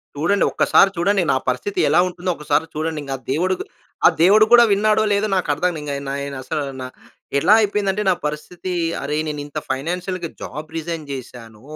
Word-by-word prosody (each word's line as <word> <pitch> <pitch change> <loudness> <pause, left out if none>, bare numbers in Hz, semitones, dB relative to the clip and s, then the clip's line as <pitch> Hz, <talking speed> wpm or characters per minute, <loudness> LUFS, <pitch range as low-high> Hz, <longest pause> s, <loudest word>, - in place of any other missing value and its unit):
చూడండి. 175 +7 +1
ఒక్కసారి 195 - +4
చూడండి. 195 +3 +2
నా - - +2
పరిస్థితి 130 +11 -2
ఎలా 160 - +4
ఉంటుందో, 180 0 -3
ఒకసారి 150 +1 0
చూడండి. 155 0 -2
ఇంక 135 - -5
ఆ - - -25
దేవుడు 185 +6 +1 0.5
ఆ - - +8
దేవుడు 205 +5 +6
కూడా 240 0 +9
విన్నాడో, 215 +2 +3
లేదో, 205 +1 +1
నాకు 185 - -1
అర్థం 175 +4 -1
ఇంక 145 -1 -5 0.2
నె 135 - -3
నేను 140 0 -5
నా 130 - -6
అసలు 150 - -3 0.7
ఎట్లా 170 +9 +4
అయిపోయిందంటే 205 -1 0
నా 190 - +5
పరిస్థితి, 155 +5 -5 0.3
అరె, 150 +2 -2
నేను 150 -1 -4
ఇంత 145 - -8
ఫైనాన్షియల్‌గా 175 +5 -3
జాబ్ 150 +3 -7
రిజైన్ 165 -1 -4
చేశాను. 115 -4 -9
165 Hz, 180 wpm, -20 LUFS, 145-195 Hz, 0.7 s, కూడా